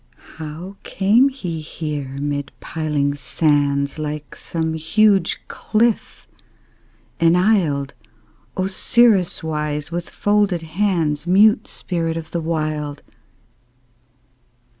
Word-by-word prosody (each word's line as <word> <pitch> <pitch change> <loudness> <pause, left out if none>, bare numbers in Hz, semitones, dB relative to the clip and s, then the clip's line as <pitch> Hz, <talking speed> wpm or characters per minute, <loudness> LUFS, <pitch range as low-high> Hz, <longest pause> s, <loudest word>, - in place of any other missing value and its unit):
How 160 +5 -7
came 220 +8 +3
he 180 - -5
here 150 -3 -5
mid 145 0 -3
piling 150 -3 -1
sands, 140 0 0
Like 150 -1 -5
some 160 -1 -3
huge 195 +5 +2
cliff 225 +1 -1 0.9
enisled, 165 -5 +3 0.6
Osiris 195 0 +2
wise, 150 -1 -3
with 170 0 -4
folded 205 -4 +1
hands, 165 -3 0
Mute 210 +6 +5
spirit 165 -2 -3
of 160 -1 -7
the 170 - -2
Wild? 155 -2 -2
160 Hz, 90 wpm, -20 LUFS, 150-190 Hz, 0.9 s, Mute